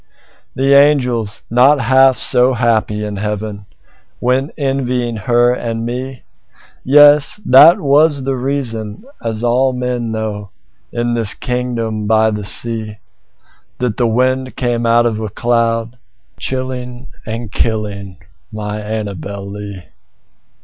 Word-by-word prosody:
The 135 +1 +2
angels, 125 -7 +2
not 130 +5 +4
half 130 -1 +4
so 125 +1 +2
happy 110 -3 0
in 105 -1 -5
heaven, 105 0 -5 0.5
Went 130 +3 0
envying 125 -4 -1
her 120 +4 +2
and 115 -2 -4
me; 125 +2 -5 0.6
Yes! 145 +5 +5
that 150 +7 +7
was 145 0 +3
the 135 0 -1
reason 125 - -4 0.2
(as 115 0 -4
all 130 +2 +2
men 125 -2 -3
know, 105 -2 -4 0.4
In 120 0 -2
this 115 -4 0
kingdom 115 -4 -3
by 110 0 +3
the 105 -1 -4
sea)That 105 - -6
the 120 - +2
wind 130 +3 0
came 120 -2 -1
out 120 +1 +4
of 115 -2 0
the 110 -1 -4
cloud 115 +1 0
by 125 - -28
night, - - -37
Chilling 130 -1 -5 0.2
and 115 -1 -5
killing 105 -4 -3 0.3
my 105 -1 -5
Annabel 100 -2 -5
Lee. 100 -2 -8
120 Hz, 125 wpm, -16 LUFS, 110-130 Hz, 0.6 s, that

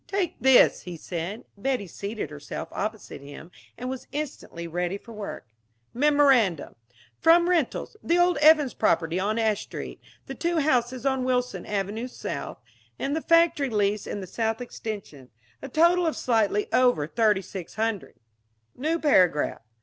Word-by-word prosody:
"Take 390 -3 -1
this," 265 -1 +6
he 175 -2 -8
said... 175 +6 -5
Betty 245 +1 -1
seated 200 -1 -6
herself 145 -1 -7
opposite 215 -7 -5
him, 145 +4 -11 0.3
and 250 - -5
was 260 0 -6
instantly 280 - -5
ready 175 +3 -2
for 230 +3 -13
work. 210 -10 -7 0.3
"... 115 +1 -45
Memorandum. 265 - +3 0.5
From 340 +1 +5
rentals 345 - 0
the 340 - +1
old 355 0 +3
Evans 300 -3 +5
property 170 -4 +1
on 210 +4 0
Ash 220 -2 +1
Street, - - -8 0.2
the - - -6
two 340 0 -1
houses 255 -4 +1
on 265 -1 +1
Wilson 250 -7 -1
Avenue 210 +4 -2
South, 255 - -6 0.4
and 280 +2 -2
the 320 - -1
factory 335 -5 +3
lease 210 -2 0
in 205 - -4
the - - -6
South 225 +4 -2
Extension, 205 - -7 0.3
a 275 - -7
total 340 +4 +3
of 320 - -1
slightly 215 -4 +1
over 245 -11 +3
$3600. 205 +1 -1 0.6
"New 310 +6 -1
paragraph. 185 - +2
225 Hz, 150 wpm, -26 LUFS, 195-280 Hz, 0.6 s, this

